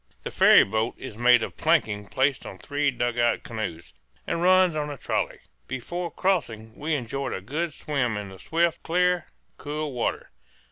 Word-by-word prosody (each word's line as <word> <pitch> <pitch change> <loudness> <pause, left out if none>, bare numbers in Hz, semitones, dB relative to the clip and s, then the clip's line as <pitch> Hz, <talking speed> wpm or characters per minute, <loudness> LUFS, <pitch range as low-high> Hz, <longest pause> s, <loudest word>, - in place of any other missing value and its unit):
The - - -5
ferry - - +7
boat 110 +3 -1
is 130 - -8
made 120 0 +5
of - - -6
planking 110 -11 +1
placed 135 +3 +1
on 95 - -9
three 145 +8 0
dugout 120 -2 0
canoes, 100 -8 -6 0.3
and 170 - -2
runs 185 -1 +5
on 150 -1 -2
a 145 - -6
trolley. - - -2 0.3
Before 170 +8 -4
crossing 115 - -1
we 155 +1 -1
enjoyed 135 +1 -3
a - - -3
good 155 - -3
swim 135 -6 -2
in 100 -1 -5
the 95 -1 -12
swift, 170 0 0
clear, 180 +1 +1 0.3
cool 150 0 -4
water. 120 - -2
135 Hz, 170 wpm, -25 LUFS, 115-160 Hz, 0.3 s, ferry